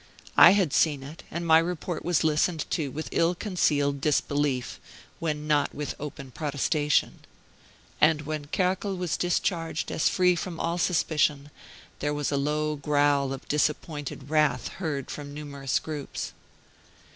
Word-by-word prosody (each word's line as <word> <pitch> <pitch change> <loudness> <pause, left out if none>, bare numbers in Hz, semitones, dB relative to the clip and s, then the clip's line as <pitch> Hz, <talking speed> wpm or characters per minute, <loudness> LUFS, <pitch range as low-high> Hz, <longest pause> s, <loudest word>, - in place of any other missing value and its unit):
I - - +10
had 180 -8 +1
seen 145 -4 +2
it, 150 +5 -10
and 170 +1 -4
my 160 -1 +7
report 175 0 -3
was 175 -2 +1
listened 155 +1 +1
to 150 -4 -1
with 155 +4 -5
ill 170 +2 +2
concealed 145 -8 0
disbelief, 145 -3 0 0.4
when 150 -2 -2
not 150 -1 +1
with 150 0 -3
open 140 -2 -7
protestation. 150 +1 0 0.8
And 150 -1 +4
when 155 0 -4
Kerkel 190 +4 0
was 180 -4 -1
discharged 170 -2 -1
as - - +2
free 180 -1 +3
from 170 -1 -5
all 170 +1 -1
suspicion, 150 -4 +1 0.5
there 145 +1 -1
was 145 -1 -1
a - - +1
low 150 +2 0
growl 145 -1 +2
of 135 0 -7
disappointed 150 -2 -2
wrath 150 -5 +2
heard 150 -7 -4
from 145 -1 -7
numerous 140 -3 -2
groups. 150 -3 -5
150 Hz, 145 wpm, -27 LUFS, 145-165 Hz, 0.8 s, I